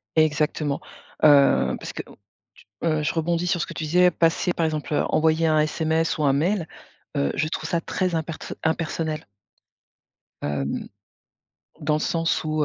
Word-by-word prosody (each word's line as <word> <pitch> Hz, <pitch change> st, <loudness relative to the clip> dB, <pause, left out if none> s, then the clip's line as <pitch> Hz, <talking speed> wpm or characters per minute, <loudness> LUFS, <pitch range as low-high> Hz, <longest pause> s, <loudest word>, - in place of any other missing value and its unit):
Exactement. 150 Hz, -2 st, +1 dB, 0.4 s
Heu, 145 Hz, -2 st, +5 dB
parce -, -, -6 dB
que, -, -, -4 dB, 0.8 s
heu, 155 Hz, -2 st, +2 dB
t -, -, -3 dB
je -, -, 0 dB
rebondis 170 Hz, +1 st, 0 dB
sur 175 Hz, -1 st, +1 dB
ce -, -, -1 dB
que 170 Hz, -, -8 dB
tu 155 Hz, -, -4 dB
disais, 180 Hz, +3 st, +4 dB
passer 165 Hz, +2 st, +1 dB
par 165 Hz, -2 st, 0 dB
exemple, 155 Hz, -1 st, -3 dB
heu, -, -, +2 dB
envoyer 160 Hz, +1 st, +2 dB
un 155 Hz, -1 st, +3 dB
SMS 160 Hz, +1 st, 0 dB
ou 150 Hz, -, 0 dB
un 140 Hz, -, +4 dB
mail, 165 Hz, +5 st, +1 dB, 0.5 s
heu, 70 Hz, 0 st, +1 dB
je 155 Hz, -, +1 dB
trouve 155 Hz, 0 st, -4 dB
ça 170 Hz, -, +1 dB
très 185 Hz, 0 st, -1 dB
impers 160 Hz, 0 st, -3 dB, 0.3 s
impersonnel 160 Hz, -1 st, -1 dB, 1.2 s
hem, 70 Hz, -1 st, -2 dB, 0.9 s
dans 150 Hz, -, +1 dB
le -, -, +1 dB
sens 165 Hz, -1 st, 0 dB
où 155 Hz, -1 st, 0 dB
160 Hz, 165 wpm, -24 LUFS, 155-165 Hz, 1.2 s, Heu